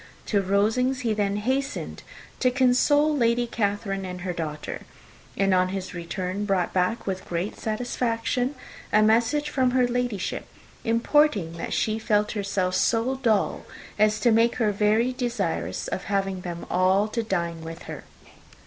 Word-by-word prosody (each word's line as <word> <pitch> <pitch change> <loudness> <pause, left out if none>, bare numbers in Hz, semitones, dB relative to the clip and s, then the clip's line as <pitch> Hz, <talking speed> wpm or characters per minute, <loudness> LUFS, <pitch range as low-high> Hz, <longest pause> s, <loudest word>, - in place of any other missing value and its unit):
To 205 -2 +1
Rosings 220 +7 +1
he 230 -3 +1
then 205 -1 0
hastened 265 +6 -2 0.4
to 255 - +4
console 275 +4 +3
Lady 240 -2 +2
Catherine 205 -3 -2
and 180 -1 -6
her 180 -1 -3
daughter; 155 -3 -5 0.6
and 195 -1 +3
on 185 0 +3
his 190 -1 -5
return 180 +3 -3
brought 195 -3 0
back, 185 +5 0
with 190 -1 -3
great 175 +4 -2
satisfaction, 245 +3 -1 0.4
a 215 0 +5
message 235 +7 +2
from 260 -3 +2
her 250 -1 +4
Ladyship, 245 -5 -2 0.4
importing 230 - +2
that - - -5
she 220 0 0
felt 210 -1 +1
herself 195 -3 -1
so 235 +6 +1
dull 225 -6 +1 0.4
as 215 0 +3
to 235 - +4
make 230 +1 +3
her 220 -4 +2
very 215 +5 +2
desirous 245 -1 -2
of - - -4
having 195 -2 -1
them 175 -1 -6
all 185 +3 +3
to 230 - -1
dine 170 -6 -2
with 165 +1 -8
her. - - -8
215 Hz, 150 wpm, -25 LUFS, 190-245 Hz, 0.6 s, a